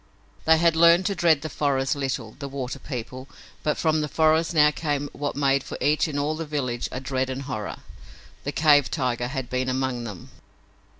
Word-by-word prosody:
They 160 0 +6
had 165 0 +3
learned 170 +2 +6
to 200 - +1
dread 165 -5 +3
the - - -2
forest 135 -3 0
little, 135 -5 -3
the 140 - -5
water 135 0 -5
people, 130 0 -7 0.3
but 150 - 0
from 155 -1 +1
the 150 - -1
forest 160 +2 +2
now 150 -2 +5
came 145 -2 -2
what 145 -1 -3
made 140 -1 +2
for - - -7
each 150 0 +2
in 150 -2 -4
all 145 +2 0
the 165 - -4
village 135 -6 -3
a 130 - -4
dread 130 0 -2
and 130 +1 -4
horror. 110 -6 -5 0.6
The - - -2
cave 145 -3 +4
tiger 125 -4 -1
had 130 -1 -4
been 130 +1 -1
among 130 -2 -2
them! 100 -6 -9
140 Hz, 195 wpm, -25 LUFS, 130-155 Hz, 0.6 s, They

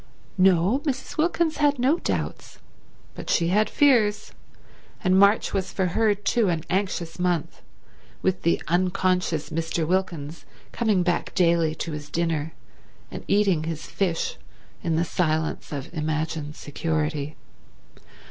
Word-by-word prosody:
No, 185 +6 +4
Mrs. 285 -3 -4
Wilkins 325 0 +1
had 290 -1 +3
no 270 +7 +2
doubts, - - -3 0.6
but - - -8
she 170 0 +2
had 210 +3 +3
fears; 215 -7 +3 0.7
and 185 -2 +3
March 200 +2 +4
was 190 -2 -1
for 190 - 0
her 215 -2 +3
too 205 +1 +1
an 165 -2 -1
anxious 185 -3 -2
month, 175 -4 -1 0.6
with 185 -1 +1
the 170 - +2
unconscious 180 -2 0
Mr. 165 0 -1
Wilkins 170 -3 -2 0.3
coming 215 -6 +1
back 175 -1 -1
daily 170 -3 +3
to 165 - -4
his 150 -1 -7
dinner 165 -2 -1 0.6
and - - -7
eating 195 -6 +2
his 160 -1 -4
fish 175 -4 -1 0.4
in 165 - 0
the 165 +2 +1
silence 160 -2 -1
of 145 +2 -6
imagined 155 -1 -2
security. 150 -1 -2
175 Hz, 130 wpm, -25 LUFS, 160-200 Hz, 0.7 s, No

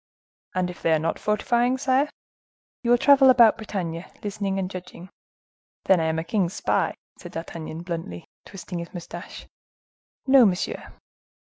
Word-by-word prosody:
"And 180 -1 0
if 175 - -14
they 165 - +2
are - - +4
not 160 +2 -2
fortifying, 240 +4 +1
sire?" 270 +2 +1 0.7
"You 235 - -2
will 245 - +6
travel 270 +1 +6
about 240 -3 +7
Bretagne, 180 -6 -4 0.2
listening 200 -1 -2
and 190 -1 -1
judging." 185 -1 -9 0.8
"Then 190 -2 +5
I 160 - 0
am 160 0 0
a 160 - -1
king's 175 0 -1
spy?" - - 0 0.2
said - - -10
D'Artagnan, 165 0 -6
bluntly, 165 - -6 0.2
twisting 180 -2 -7
his 170 +2 -8
mustache. 175 - -8 0.8
"No, 270 -1 +7
monsieur." 190 -4 -1
185 Hz, 150 wpm, -24 LUFS, 170-235 Hz, 0.8 s, about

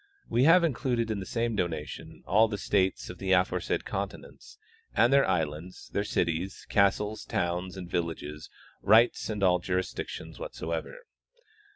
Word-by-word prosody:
We 125 +3 +2
have 170 +3 +7
included 120 -6 0
in 105 - -2
the 95 - -6
same 115 -1 -1
donation 85 -6 -4
all 110 +3 +4
the 105 -2 -4
states 95 -2 0
of - - -12
the 95 -1 +1
aforesaid 90 -1 +1
continents - - -6 0.4
and 120 +3 +4
islands, 90 - 0
their 100 - +1
cities, 90 -1 -2
castles, 105 +1 +2
towns, 90 +2 -2
and 90 -2 -6
villages, 80 -3 -4 0.3
rights, 115 +4 +4
and 105 -2 -2
all 90 -1 +4
jurisdictions 90 +1 -4
whatsoever. - - -5
95 Hz, 140 wpm, -29 LUFS, 90-115 Hz, 0.4 s, have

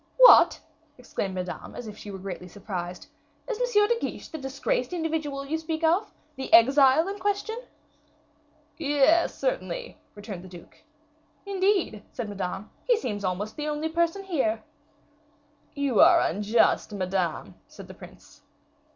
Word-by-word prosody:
"What!" - - +8 0.4
exclaimed 200 -6 -4
Madame, 180 -1 -6
as 245 - -7
if 210 - -8
she 210 - -10
were 195 - -6
greatly 185 -1 -7
surprised, 180 -2 -6 0.4
"is 485 -1 -3
M. 415 0 +6
de 470 +1 +1
Guiche - - -5
the 315 - -7
disgraced 275 - -2
individual 315 -5 -2
you 320 +3 -2
speak 320 0 -4
of, 350 +6 +2 0.3
the 265 - -6
exile 270 +6 +6
in 400 +1 -5
question?" 410 +3 -2 1.2
"Yes, 295 +2 +3
certainly," - - -3 0.2
returned 205 -3 -8
the - - -11
duke. 175 -2 -14 0.6
"Indeed," 385 - 0
said 235 -4 -5
Madame, 200 0 -5
"he 485 -2 +3
seems 210 - -4
almost 190 +3 -3
the 300 0 -3
only 300 +1 -2
person 340 +4 0
here!" 250 - -1 1.1
"You 280 -5 0
are 340 +1 +7
unjust, 215 -1 +2
Madame," 185 -3 -2
said - - -12
the - - -10
prince. - - -15
275 Hz, 140 wpm, -26 LUFS, 205-345 Hz, 1.2 s, What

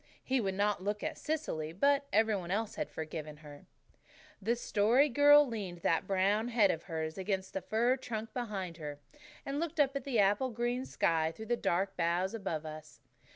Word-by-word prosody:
He 260 -1 +1
would 195 -2 -2
not 205 -1 0
look 205 +1 -2
at - - -2
Cecily, 280 - -3
but 280 +8 +2
every 220 0 +3
one 180 -3 -5
else 210 +3 -1
had - - -4
forgiven 155 -1 -6
her. 150 -2 -13 0.7
The 225 +4 +1
Story 240 +5 +3
Girl 290 +3 +7
leaned 200 -8 -5
that 165 +3 +1
brown 200 +4 +2
head 225 -5 +4
of 165 - -5
hers 160 0 -4
against 190 0 -2
the 190 - -2
fir 235 +7 +1
trunk 225 -3 -5
behind 195 -8 -4
her, 150 -3 -6 0.5
and 275 +1 -2
looked 330 -1 -3
up 280 -1 +3
at 275 - -2
the 260 -4 -1
apple 205 +5 +3
green 240 +2 -2
sky 160 -1 +1
through 220 +6 -9
the - - +4
dark 190 -2 0
boughs 175 +3 +1
above 180 -8 -3
us. 155 0 -9
205 Hz, 190 wpm, -32 LUFS, 170-240 Hz, 0.7 s, Girl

